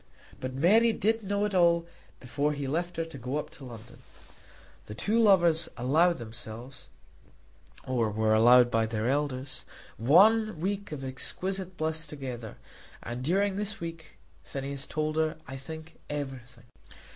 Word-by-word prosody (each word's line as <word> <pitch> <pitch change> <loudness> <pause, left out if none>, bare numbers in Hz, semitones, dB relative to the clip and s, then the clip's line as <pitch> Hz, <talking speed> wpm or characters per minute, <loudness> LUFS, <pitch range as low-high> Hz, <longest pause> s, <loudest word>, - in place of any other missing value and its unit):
But 130 0 -5
Mary 220 - +5
did 225 +1 +1
know 200 0 0
it 210 - -2
all 170 -2 +4 0.3
before 140 +4 -1
he 145 -1 -4
left 170 +5 -2
her 165 - -1
to 165 -4 -10
go 125 +4 -3
up 150 - -4
to - - -15
Dublin. 120 0 -11 0.9
The 105 - -7
two 220 - +1
lovers 175 -6 +4
allowed 160 +8 +3
themselves, 120 +2 -8 1.0
or 120 -4 +1
were 110 +1 +1
allowed 120 +2 +6
by 115 0 +2
their 110 0 -2
elders, 135 -1 -1 0.3
one 205 - +5
week 200 +3 -2
of 145 -3 -5
exquisite 185 +8 -3
bliss 160 +1 -2
together; 125 -6 -7 0.5
and 120 +1 -5
during 195 +6 +1
this 210 +2 -4
week, 165 -2 -8 0.3
Phineas 140 0 -6
told 155 0 -2
her, 155 -1 +1
I 135 - -6
think, 160 +4 -9
everything. 130 -5 -6
150 Hz, 145 wpm, -29 LUFS, 125-175 Hz, 1.0 s, allowed